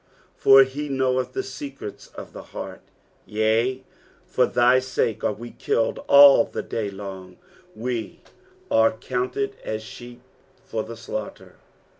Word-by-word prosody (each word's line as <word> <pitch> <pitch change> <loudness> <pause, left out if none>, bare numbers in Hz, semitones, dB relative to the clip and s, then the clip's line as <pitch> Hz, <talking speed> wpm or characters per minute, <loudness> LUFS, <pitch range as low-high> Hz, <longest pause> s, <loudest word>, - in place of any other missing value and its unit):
for 135 0 +7
he 140 +3 -5
knoweth 130 -1 0
the - - -2
secrets 135 -5 -8
of - - -9
the - - -8 0.2
heart. - - -7 0.4
22 105 - -8
Yea, 115 +4 +1 0.4
for - - +2
thy 125 +1 +4
sake 120 -4 -2
are - - +2
we 120 +3 -8
kilted 115 - -1
all 140 0 +8
the - - -6
day 110 -3 -3
long; 95 -2 -9 0.4
we 115 0 -4 0.5
are 110 0 +4
counted 125 +4 -3
as 110 0 -4
sheep 120 +2 -11 0.4
for 110 - -3
the 115 +1 -9
slaughter. 110 -2 -7
120 Hz, 140 wpm, -24 LUFS, 110-130 Hz, 0.5 s, all